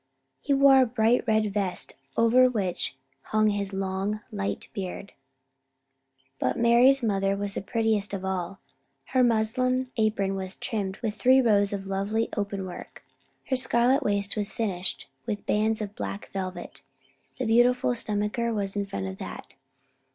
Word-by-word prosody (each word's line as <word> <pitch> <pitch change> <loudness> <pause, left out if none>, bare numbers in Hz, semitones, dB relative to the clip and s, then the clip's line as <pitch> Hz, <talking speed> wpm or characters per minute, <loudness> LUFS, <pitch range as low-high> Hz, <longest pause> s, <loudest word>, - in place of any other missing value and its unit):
He 285 - -3
wore 275 -1 +6
a 255 - +3
bright 230 0 +2
red 215 -2 +1
vest, 195 -3 -1 0.2
over 245 +3 +5
which 195 - -2 0.3
hung 215 0 +2
his 200 -1 -2
long 195 +2 -2
light 200 -2 -3
beard. 195 0 -6 1.3
But 125 - 0
Mari's 240 +3 +5
mother 195 -2 +1
was 200 0 -2
the - - -3
prettiest 215 0 0
sight 200 - -3
of 190 - -8
all. 190 0 -3 0.5
Her 260 - +2
muslin 250 +3 +1
apron 215 -3 +1
was 190 -1 -4
trimmed 195 -4 -3
with 215 -2 -1
three 255 +6 +4
rows 205 -5 +3
of 200 -1 -4
lovely 200 +4 -1
open 200 -2 -3
work. 180 - -10 0.5
Her 265 - +2
scarlet 255 +1 +3
waist 200 -1 -1
was 205 -1 -2
finished 190 -5 -2 0.2
with 205 -1 -3
bands 215 +1 +1
of 205 -1 -5
black 100 - -6
velvet, 185 -1 -6 0.5
with - - -41
the 255 - -2
beautiful 245 +3 +3
stomacher 220 0 -1 0.2
in 200 -1 -1
front 100 - -4
of 95 0 -6
that. - - -8
210 Hz, 155 wpm, -26 LUFS, 195-235 Hz, 1.3 s, wore